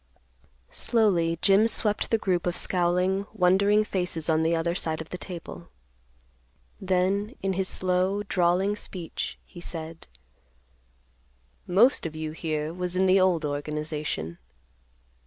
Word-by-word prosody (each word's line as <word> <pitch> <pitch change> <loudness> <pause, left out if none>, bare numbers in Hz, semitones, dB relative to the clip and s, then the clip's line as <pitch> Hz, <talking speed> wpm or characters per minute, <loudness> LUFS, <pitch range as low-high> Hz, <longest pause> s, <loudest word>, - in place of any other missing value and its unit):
Slowly 180 -8 +1
Jim 200 +3 +5
swept 215 -2 0
the 225 - +3
group 180 -5 0
of 175 - -1
scowling, 185 +2 +1
wondering 200 +2 +4
faces 180 -5 -2
on 160 0 +2
the 165 +1 +2
other 170 +1 0
side 160 -3 -2
of 160 - -7
the 180 - -5
table. 170 - -8 1.1
Then, 190 +4 0
in 195 0 +1
his 190 0 -1
slow 185 +3 0
drawling 190 +1 +1
speech, 180 -5 -6
he 175 - -12
said, 165 -1 -7 1.6
"Most 205 - +4
of 155 - -9
you 155 0 -4
here 155 -1 -3
was 180 0 -3
in 190 +1 +3
the 190 +1 +5
old 180 -4 +2
organization. 150 - -3
180 Hz, 130 wpm, -26 LUFS, 165-195 Hz, 1.6 s, Jim